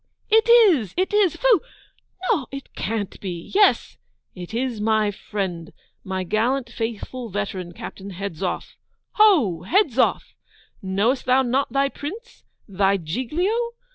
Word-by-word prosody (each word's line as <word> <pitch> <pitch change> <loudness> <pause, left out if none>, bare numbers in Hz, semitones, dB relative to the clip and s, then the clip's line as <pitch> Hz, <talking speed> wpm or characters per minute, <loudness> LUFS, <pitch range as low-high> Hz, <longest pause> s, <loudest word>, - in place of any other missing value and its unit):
It 445 +1 +4
is, 370 - +5
it 375 +2 0
is! 410 -5 +3
Phoo! 480 -9 +3 0.7
No, 265 -6 0
it 275 0 -9
can't 210 -1 -4
be! 175 -4 -6
Yes! 410 +1 +3 0.4
It 180 0 -9
is 235 -1 -2
my 215 -1 +2
friend, 190 -5 -5 0.3
my 190 -1 -3
gallant 235 +6 0
faithful 230 +2 -5
veteran, 195 -3 -4
Captain 195 +3 -9
Hedzoff! 185 -2 -5 0.4
Ho! 290 - +5
Hedzoff! 330 - +2 0.5
Knowest 205 +7 0
thou 260 +1 +4
not 255 +1 0
thy 275 +2 +2
Prince, 385 - -8 0.2
thy 195 0 +2
Giglio? 260 - -2
230 Hz, 125 wpm, -23 LUFS, 195-285 Hz, 0.7 s, is